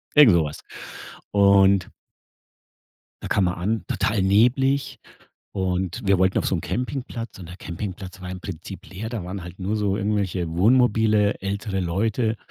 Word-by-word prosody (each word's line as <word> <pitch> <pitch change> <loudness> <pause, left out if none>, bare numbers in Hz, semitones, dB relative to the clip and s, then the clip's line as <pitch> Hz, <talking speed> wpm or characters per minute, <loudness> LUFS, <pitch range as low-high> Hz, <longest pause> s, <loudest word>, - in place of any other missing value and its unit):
irgend 145 -9 +8
so 85 -2 +4
was. 75 -1 -6 0.7
Und 100 -2 +4 1.3
Da - - -3
kam 100 - +2
man 90 0 +1
an, 105 +6 -2
total 105 -4 0
neblig, 125 +8 +2 0.6
und 95 +3 -2
wir 95 -1 +4
wollten 95 +1 +2
auf - - -1
so - - +1
'n 85 - -1
Campingplatz, 115 - -4
und 90 -3 -10
der 90 - -9
Campingplatz 95 +1 -7
war 90 0 -7
im 90 0 -6
Prinzip 95 +1 -8
leer. 100 +4 -6
Da 115 -6 -5
waren 95 +1 -6
halt 85 +1 -10
nur 95 +3 -2
so 100 -2 0
irgendwelche 100 -4 -1
Wohnmobile, 105 +1 +3
ältere 100 0 -3
Leute 110 +6 0
100 Hz, 160 wpm, -23 LUFS, 90-110 Hz, 1.3 s, irgend